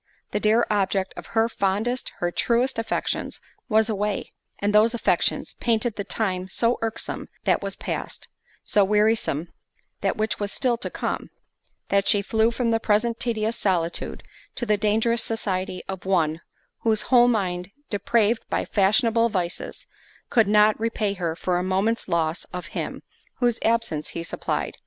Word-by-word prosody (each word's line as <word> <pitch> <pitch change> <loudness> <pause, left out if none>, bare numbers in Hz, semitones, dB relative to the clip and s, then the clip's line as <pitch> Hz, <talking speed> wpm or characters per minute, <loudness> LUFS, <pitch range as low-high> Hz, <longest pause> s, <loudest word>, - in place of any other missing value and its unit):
The 210 - 0
dear 220 +3 +3
object 195 -2 +1
of - - -9
her 225 +1 +5
fondest, 220 +4 -1
her 175 0 -1
truest 240 +5 +1
affections, 225 - -2 0.3
was 220 0 +4
away; 210 -2 -2 0.2
and 205 +1 0
those 220 +3 +5
affections, 235 - +1
painted 230 -1 0
the 200 - -3
time 185 -2 -2
so 230 +5 +2
irksome 225 -1 -4
that - - +2
was - - -3
past; - - -5 0.4
so 205 - +3
wearisome, 210 -6 +2 0.5
that, - - 0
which 215 0 -1
was 205 -1 -2
still 245 +2 +1
to 245 - -4
come; - - -3 0.6
that 200 0 +2
she 205 -1 +4
flew 220 +2 +2
from 235 0 0
the 225 - +2
present 225 +2 +1
tedious 225 -1 -1
solitude, 175 -6 -1 0.3
to 240 - -2
the 210 -2 +3
dangerous 220 +3 +2
society 190 -4 -2
of 190 -1 -5
one, 165 -4 +1 0.4
whose 220 -2 +2
whole 245 0 +5
mind 180 -6 0 0.2
depraved 225 +2 +2
by - - 0
fashionable 225 +3 +3
vices, 180 -4 -3 0.5
could 225 -4 +4
not 210 +1 +5
repay 220 -2 0
her 170 -4 -2
for 175 +1 0
a - - -1
moment's 195 +5 0
loss 165 -2 0
of 180 -2 -7
him, - - -4 0.3
whose 240 -2 +1
absence 225 -10 0
he 165 - -3
supplied. - - -3
210 Hz, 155 wpm, -24 LUFS, 190-230 Hz, 0.6 s, her